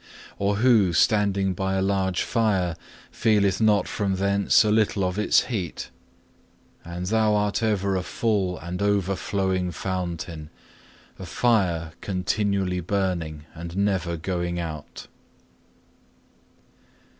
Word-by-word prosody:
Or 100 +1 +1
who 110 -5 +4
standing 100 +1 +2
by 95 +1 -2
a 95 - +1
large 95 -2 0
fire, 100 -8 +1 0.4
feeleth 100 -3 +2
not 105 -2 +3
from 100 -2 -1
thence 100 +3 +3
a 105 - +1
little 105 -2 +2
of 90 +2 -1
its 105 - +4
heat? 100 -10 -4 0.9
And 85 +1 -6
Thou 110 +1 +2
art 105 +1 0
ever 100 -3 +1
a 95 - 0
full 95 -2 -1
and 90 +2 -6
overflowing 95 -2 0
fountain, 85 -3 -4 0.7
a - - -6
fire 90 -9 +1
continually 95 -1 -1
burning, 85 -5 -2
and 85 +2 -7
never 95 -4 0
going 85 0 -2
out. 80 -3 -7
95 Hz, 115 wpm, -25 LUFS, 90-105 Hz, 0.9 s, who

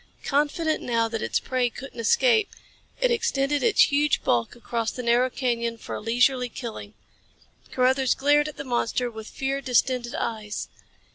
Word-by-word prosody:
Confident 300 +3 0
now 230 -1 0
that 225 -1 -4
its - - 0
prey 255 -2 0
couldn't 265 0 -10
escape, 460 - +3 0.5
it - - +2
extended 290 -10 0
its 450 - +5
huge 290 0 +2
bulk 120 - 0
across 230 -1 -3
the 250 - -6
narrow 240 +2 +3
canyon 235 -3 -2
for - - -8
a - - -4
leisurely 245 +3 +2
killing. 220 -3 -8 0.8
Carruthers 260 0 +2
glared 290 +2 +3
at 305 - -8
the - - -5
monster 245 -1 -1
with 220 -1 -9
fear 275 +1 -2
distended 250 -1 0
eyes. 215 -2 -4
250 Hz, 155 wpm, -25 LUFS, 235-280 Hz, 0.8 s, its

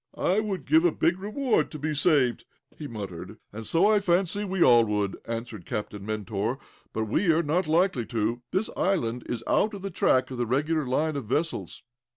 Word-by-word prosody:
"I 190 +4 +2
would 200 -7 -3
give 160 +3 +4
a 175 - +4
big 175 +4 +1
reward 215 +5 0
to 155 - -7
be 155 +1 -2
saved," 140 -5 +2 0.3
he 150 - -7
murmured. 100 -3 -7 0.2
"And 110 +1 -5
so, 170 +4 +3
I 210 0 +5
fancy, 190 +1 +1
we 190 -3 +1
all 120 -1 +7
would," 105 -2 -1
added 115 -4 -5
Captain 105 -3 -4
Mentor. 110 +2 -2 0.3
"But 110 - -2
we 110 - 0
are 165 +2 +2
not 165 +3 0
likely 160 - +2
to. 115 +2 -1
This 195 +4 -1
island 125 -11 0
is 115 -1 -3
out 210 0 +1
of 195 - -9
the 195 - -4
track 130 -5 +2
of 125 - -5
the 120 - 0
regular 150 +4 0
line 155 +4 0
of 140 -4 -4
vessels." 150 +9 -2
145 Hz, 195 wpm, -27 LUFS, 115-180 Hz, 0.3 s, all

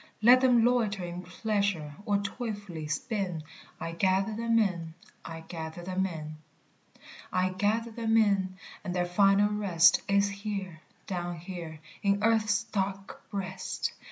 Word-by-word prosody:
Let 250 +3 +8
them 245 -3 +5
loiter 220 -6 +2
in 175 0 -5
pleasure 185 -4 -1
or 205 -1 +3
toilfully 200 -8 -5
spin 180 0 -2 0.4
I 165 - -4
gather 190 +4 +1
them 230 +1 +1
in, 170 -7 0 0.3
I 165 0 -7
gather 160 0 -7
them 190 +1 0
in. 155 -3 -7 0.9
"I 185 0 +2
gather 210 +5 0
them 225 0 +1
in, 195 -4 +2 0.3
and 180 - -3
their 175 -1 +1
final 195 +3 +4
rest 190 -5 +4
Is 200 0 +3
here, 200 -5 -5 0.2
down 175 -2 -3
here, 165 -2 -7 0.2
in 200 0 +1
earth's 220 -1 +3
dark 195 -3 -4
breast!" 190 -3 -3
195 Hz, 135 wpm, -29 LUFS, 175-210 Hz, 0.9 s, Let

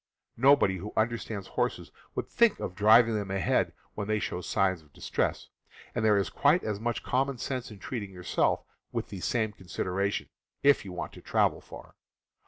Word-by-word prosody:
Nobody 135 -9 +5
who 100 +4 -7
understands 110 -3 -1
horses - - -2 0.2
would - - -2
think 235 -3 +3
of - - -4
driving 110 +4 +6
them 105 -2 -2
ahead 95 -3 +1 0.2
when 105 -1 -4
they 110 0 +1
show 90 -3 -3
signs 95 -1 +1
of 75 -2 -24
distress, - - -2 0.4
and 120 - -1
there 105 -2 +5
is 100 -3 +1
quite 150 +5 +3
as 105 -2 -2
much 120 +2 -2
common 135 +1 0
sense 130 +1 -3
in 105 - -10
treating 105 -2 -5
yourself 90 -2 0 0.3
with - - -3
the 95 - -6
same 110 +3 0
consideration, 95 +1 -2 0.4
if 140 0 +5
you 95 - -8
want 90 - -5
to - - -12
travel - - +1
far. - - -12
105 Hz, 180 wpm, -29 LUFS, 95-120 Hz, 0.4 s, driving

